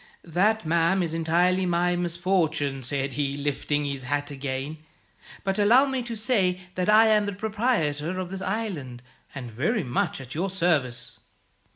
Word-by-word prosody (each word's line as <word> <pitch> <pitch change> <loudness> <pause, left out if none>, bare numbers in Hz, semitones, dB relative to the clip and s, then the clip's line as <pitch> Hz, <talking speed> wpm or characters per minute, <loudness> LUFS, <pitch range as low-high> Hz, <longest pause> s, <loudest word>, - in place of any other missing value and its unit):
'That, 195 +5 +1
ma'am, 170 +3 +2
is 165 -2 -3
entirely 175 +3 +2
my 175 0 +1
misfortune,' 170 -5 0
said 135 +1 -2
he, 140 +1 -1
lifting 145 +1 -1
his 140 -1 -3
hat 145 +2 -2
again; 140 +2 -4 0.6
'but 195 0 -1
allow 235 +7 +6
me 265 -2 -1
to 235 -1 -5
say 210 -5 +1
that 180 +2 -1
I 215 +1 +7
am 210 -2 +3
the 205 - -2
proprietor 185 - -1
of 185 -1 -4
this 195 0 -5
island, 180 - -4 0.3
and 125 -4 -6
very 170 - 0
much 155 +7 -1
at 135 -1 -9
your 180 +5 -1
service.' 165 -10 -1
175 Hz, 160 wpm, -26 LUFS, 145-195 Hz, 0.6 s, I